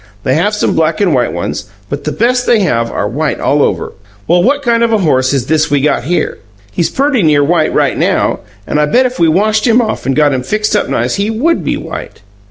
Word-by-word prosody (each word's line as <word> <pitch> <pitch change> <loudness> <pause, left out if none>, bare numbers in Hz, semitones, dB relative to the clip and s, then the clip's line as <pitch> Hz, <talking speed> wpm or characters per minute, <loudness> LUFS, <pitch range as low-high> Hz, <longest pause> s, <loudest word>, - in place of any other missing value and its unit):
They 130 - +1
have 205 +9 +1
some - - 0
black 160 0 0
and 195 -6 +2
white 125 -2 +1
ones; - - -4 0.2
but 140 +4 -6
the 155 - -1
best 245 +5 0
they 230 -3 +3
have 115 -11 0
are 100 - -2
white 145 +7 -2
all 145 +1 +1
over. 90 -10 -1 0.3
Well, 175 +10 +3
what 280 +7 +1
kind 235 -2 +1
of 235 -1 +2
a 220 - +3
horse 130 -9 +1
is 135 -4 -1
this 155 +2 +1
we 145 0 +2
got 135 -3 0
here? 175 +4 -1 0.3
He's 165 +10 -1
perty 275 -3 +1
near 150 -4 +3
white 160 +1 +1
right - - +1
now, - - 0 0.3
and 150 - 0
I 150 - +1
bet 250 +12 +3
if 255 -4 -3
we 170 - +4
washed 215 +7 +1
him 235 +1 +4
off 220 - -2
and 135 - +1
got 150 -2 +3
him 130 - -1
fixed 215 +10 -1
up 210 - 0
nice - - -1
he 200 +2 -1
WOULD 275 +10 0
be - - -1
white. - - -8
170 Hz, 245 wpm, -13 LUFS, 145-220 Hz, 0.3 s, we